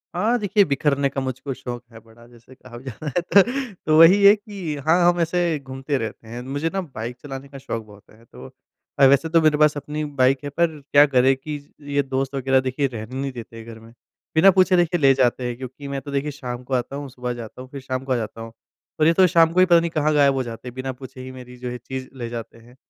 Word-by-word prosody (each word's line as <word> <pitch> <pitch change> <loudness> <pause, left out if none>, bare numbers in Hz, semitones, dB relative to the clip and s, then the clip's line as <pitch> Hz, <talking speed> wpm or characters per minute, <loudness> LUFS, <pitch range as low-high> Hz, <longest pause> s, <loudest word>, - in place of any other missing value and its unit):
हाँ 225 +7 +2
देखिए, 205 -1 +3
बिख़रने 140 -1 +1
का 135 0 -4
मुझको 130 +1 -4
शौक 125 -1 -7
है 115 - -12
बड़ा 115 +1 -19
जैसे 120 +2 -18
कहा 125 -2 -13
भी 120 - -13
जाता 150 - -2
है 255 +3 -3
तो 155 0 +3
वही 185 +5 +7
है 200 +1 +9
कि 200 -7 -6
हाँ, 175 +2 +5
हम 175 - -5
ऐसे 170 -1 0
घूमते 135 +1 -4
रहते 110 -1 -6
हैं। 120 +2 -7
मुझे 140 +5 -3
ना 195 - -1
बाइक 125 -7 -7
चलाने 135 -1 -7
का 140 - -10
शौक 115 -4 -5
बहुत 105 -1 -18
है। 110 +2 -20
तो 115 - -12 0.5
अ, 140 - +7
वैसे 140 +4 +4
तो 165 0 +4
मेरे 155 -1 +3
पास 150 0 +4
अपनी 150 +2 -4 0.2
बाइक 130 +2 +3
है 145 - -4
पर 160 +1 -1
क्या 145 +1 +7
करें 135 -1 +3
कि 150 +3 -6 0.4
ये 145 - +4
दोस्त 135 +1 -3
वग़ैरह 135 0 +2
देखिए 130 +2 -1
रहने 115 0 -8
नहीं 140 0 -3
देते 115 -2 -10
घर 115 0 -11
में। 115 +1 -16 0.4
बिना 190 +5 +7
पूछे 185 0 +4
देखिए 175 0 +2
ले 135 -2 +5
जाते 125 -1 +1
हैं 120 - -4
क्योंकि 130 +2 -9
मैं 140 -1 -4
तो 145 - -9
देखिए 140 +2 -1
शाम 125 -3 -7
को 130 - -6
आता 125 +2 -1
हूँ, 140 -1 -6
सुबह 125 -1 -5
जाता 120 +1 -9
हूँ 130 - -11
फ़िर 140 0 -8
शाम 130 0 -4
को 135 - -5
आ - - +1
जाता 115 -1 -5
हूँ। 115 0 -8
तो 155 - -8
जैसे - - +5
ये - - +4
तो 185 +2 +5
शाम 165 -2 +5
को 180 - +2
ही 185 - +7
पता 170 -2 +5
नहीं 170 0 -1
कहाँ 155 -1 +1
गायब 140 -2 +4
हो 135 -1 -1
जाते 115 +1 -8
हैं 125 - -7
बिना 130 +1 -4
पूछे 130 0 -11
ही 130 0 -8
मेरी 125 -1 -11
जो 125 0 -6
है 125 - -5
चीज़ 130 +2 -7
ले 120 -2 -5
जाते 115 -1 -7
हैं। 120 +2 -18
135 Hz, 260 wpm, -22 LUFS, 125-155 Hz, 0.5 s, है